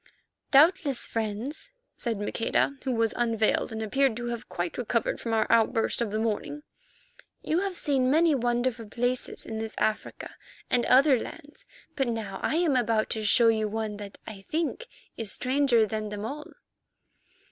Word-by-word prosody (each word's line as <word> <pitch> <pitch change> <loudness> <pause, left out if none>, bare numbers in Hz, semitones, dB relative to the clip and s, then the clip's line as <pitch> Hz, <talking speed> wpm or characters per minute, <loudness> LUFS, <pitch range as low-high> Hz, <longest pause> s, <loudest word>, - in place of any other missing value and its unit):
"Doubtless, 285 -2 +4
friends," 225 - -4 0.2
said 230 -3 -2
Maqueda, 215 +6 0
who 265 - 0
was 225 -2 +1
unveiled 225 -3 +1
and 220 0 -4
appeared 265 +1 +1
to 240 - -5
have 235 -1 -6
quite 175 +4 -4
recovered 235 -1 -1
from 230 - -4
our 220 -1 +2
outburst 225 +1 +2
of 235 - 0
the 215 - -2
morning, 225 +7 -2 0.8
"you 320 - +1
have 385 -2 -3
seen 265 -3 +1
many 320 +3 +4
wonderful 240 -2 -1
places 245 +3 -2
in 220 -1 -5
this 220 0 -5
Africa 215 0 -2 0.4
and 245 - +2
other 265 0 +5
lands, 295 +4 -10 0.3
but 270 -3 0
now 220 -5 -4
I - - 0
am 330 -4 +2
about 225 -3 +1
to 220 - -1
show 230 +2 +5
you 220 -1 +1
one 215 -1 -3
that, 205 -1 -9
I 205 -3 -9
think, 325 - -3 0.3
is 220 -4 0
stranger 255 -3 +3
than 215 0 -4
them 210 0 -5
all." 295 +6 -6
235 Hz, 165 wpm, -27 LUFS, 220-270 Hz, 0.8 s, other